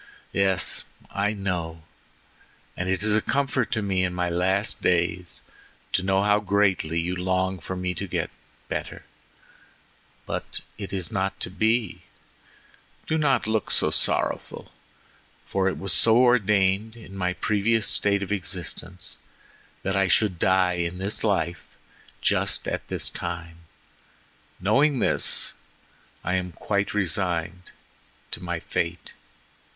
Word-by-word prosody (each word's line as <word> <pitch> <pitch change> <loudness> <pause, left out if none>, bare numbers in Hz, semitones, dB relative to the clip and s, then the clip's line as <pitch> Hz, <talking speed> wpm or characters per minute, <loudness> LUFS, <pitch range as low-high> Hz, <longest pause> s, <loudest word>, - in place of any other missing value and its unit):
"Yes, 95 -1 +2 0.3
I 105 +1 0
know, 85 -5 -3 0.9
and 90 +1 -3
it 95 +1 +1
is 105 -1 +4
a 110 - +3
comfort 135 -2 0
to 110 -2 -1
me 95 -2 +1
in 90 -1 -1
my 90 -1 0
last 95 +4 +1
days 90 0 0 0.5
to - - +1
know 95 +1 +2
how 105 0 +4
greatly 95 -5 +1
you 90 +2 -1
long 95 +1 0
for 95 +3 -5
me 90 0 -2
to - - -5
get - - -2 0.4
better, - - -5 1.2
but - - -3 0.2
it 100 - -5
is 95 -3 -3
not 95 0 -1
to - - -2
be. 110 0 0 1.0
Do 160 - 0
not 135 -5 +2
look 110 -1 0
so - - +5
sorrowful, - - 0 0.7
for 95 -1 +1
it - - -4
was 95 -3 0
so 115 +3 +6
ordained 105 -3 +3
in 105 -4 -12
my 90 -1 0
previous 105 +3 +1
state 100 -1 +3
of 100 - -6
existence 95 -4 -2 0.7
that 95 0 -1
I 95 0 +3
should 95 -2 +2
die 95 -1 +3
in 85 +1 -3
this 95 +3 -2
life 85 -6 0 0.6
just - - +1
at - - -3
this - - 0
time; 85 -1 -5 1.0
knowing 135 +9 +3
this, - - +2 0.7
I 90 - -1
am 90 -1 -4
quite 100 +3 -1
resigned 90 -2 -1 0.6
to - - -3
my 85 -1 -3
fate. 85 +1 -3
95 Hz, 135 wpm, -25 LUFS, 90-105 Hz, 1.2 s, so